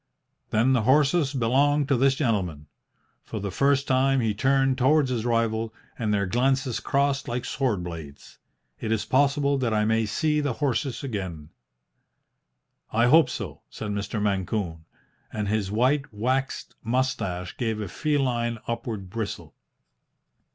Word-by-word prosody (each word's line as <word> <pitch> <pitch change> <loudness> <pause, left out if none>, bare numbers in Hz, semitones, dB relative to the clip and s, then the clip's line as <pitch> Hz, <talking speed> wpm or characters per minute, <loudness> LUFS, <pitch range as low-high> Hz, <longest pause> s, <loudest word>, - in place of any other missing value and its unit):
"Then 115 +5 +3
the 125 - +3
horses 145 +4 +3
belong 140 +3 +2
to 140 0 +2
this 135 +2 +3
gentleman." 95 - -1 0.6
For 110 - -6
the 100 -1 -4
first 140 +6 +2
time 135 +1 +3
he 110 -3 +1
turned 135 +4 +2
towards 135 +1 +3
his 115 -2 -2
rival, 115 -1 0 0.2
and 110 -3 -1
their 100 -1 +1
glances 130 +4 +1
crossed 140 0 0
like 120 +1 -3
sword 115 -10 -1
blades. 80 -5 -9 0.4
"It 110 - -3
is 110 -2 0
possible 140 +1 +2
that 120 -4 0
I 105 0 +2
may 110 0 +1
see 150 - +1
the 145 -3 -1
horses 135 -1 -1
again." 95 - -5 1.4
"I 115 +2 +3
hope 155 +2 +6
so," 100 - -6
said 105 -2 -5
Mr. 100 +2 -3
Mancune; 95 -4 -2 0.5
and 105 -1 -3
his 105 -2 0
white, 130 +6 +1
waxed 130 +6 -2
moustache 110 -7 -1
gave 110 -3 -1
a 105 - -3
feline 120 - 0
upward 115 -4 -4
bristle. 110 -1 -5
120 Hz, 145 wpm, -26 LUFS, 105-135 Hz, 1.4 s, hope